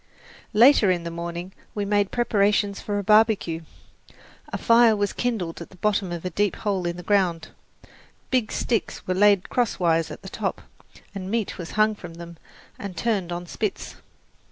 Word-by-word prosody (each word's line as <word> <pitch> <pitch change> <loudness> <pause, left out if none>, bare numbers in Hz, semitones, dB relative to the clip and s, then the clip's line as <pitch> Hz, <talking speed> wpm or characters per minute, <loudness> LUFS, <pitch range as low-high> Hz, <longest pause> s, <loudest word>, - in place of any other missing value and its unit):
Later 230 -1 +6
in 175 -2 +1
the 170 - -5
morning 170 +2 -6 0.2
we 205 -1 -1
made 205 -1 +1
preparations 205 -3 +1
for 205 -1 -2
a 205 - -2
barbecue. 210 -6 +3 0.9
A - - -3
fire 230 -1 +5
was 205 -1 -1
kindled 200 -10 -2
at 170 - -8
the - - -16
bottom 200 -1 0
of 175 0 -5
a 180 - -2
deep 205 +2 0
hole 195 -4 -2
in 170 0 -3
the 175 - -8
ground, 180 -4 +1 0.8
big 250 -4 +1
sticks 230 -5 -2
were 185 - 0
laid 200 0 +4
crosswise 170 -9 +1
at - - -9
the - - -8
top, - - -3 0.5
and 190 -2 -6
meat 220 -3 -2
was 170 - -7
hung 215 0 +4
from 175 -5 -10
them 170 0 -10 0.4
and 195 -3 -7
turned 200 -4 -1
on 175 +1 -4
spits. 205 +3 -4
200 Hz, 175 wpm, -24 LUFS, 175-215 Hz, 0.9 s, Later